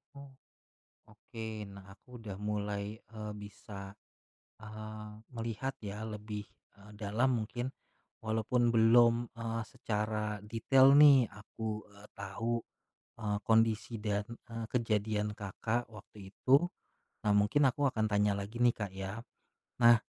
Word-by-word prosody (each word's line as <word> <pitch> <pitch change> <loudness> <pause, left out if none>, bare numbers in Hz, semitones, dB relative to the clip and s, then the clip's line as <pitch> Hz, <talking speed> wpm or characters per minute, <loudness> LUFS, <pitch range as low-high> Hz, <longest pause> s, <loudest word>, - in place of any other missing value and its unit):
Oh, 140 -1 -11 0.8
oke, 115 -1 -9 0.2
nah, 100 -1 -11
aku 125 +4 -14
udah 105 -4 -7
mulai, 105 0 -3
eee, 110 -1 -8
bisa, 100 -1 -9 0.7
eee, 110 0 -8 0.3
melihat 115 +3 -3
ya 105 +1 -6
lebih, 105 -1 -5 0.3
eee, 100 +1 -15
dalam 115 +4 +1
mungkin, 120 +4 -4 0.5
walaupun 115 +2 +1
belum, 115 +1 +5
eee, 115 0 -3
secara 105 -3 -2
detail 130 +5 +5
nih 140 -5 +8
aku, 105 +1 -5
eee, 100 +1 -16
tahu, 115 +4 -2 0.6
eee, 105 -1 0
kondisi 115 0 +2
dan, 105 -1 0 0.2
eee, 115 -1 -5
kejadian 105 -3 0
Kakak 110 +4 -2
waktu 100 -2 -12
itu, 140 +7 +4 0.6
nah, 105 - +3
mungkin 105 +8 +4
aku 140 +3 +1
akan 110 -4 0
tanya 105 0 +3
lagi 100 +3 -5
nih 120 -1 +5
Kak, 100 -3 -4
ya. 95 +3 -5 0.6
Nah, 120 0 +9
110 Hz, 125 wpm, -33 LUFS, 105-115 Hz, 0.8 s, Nah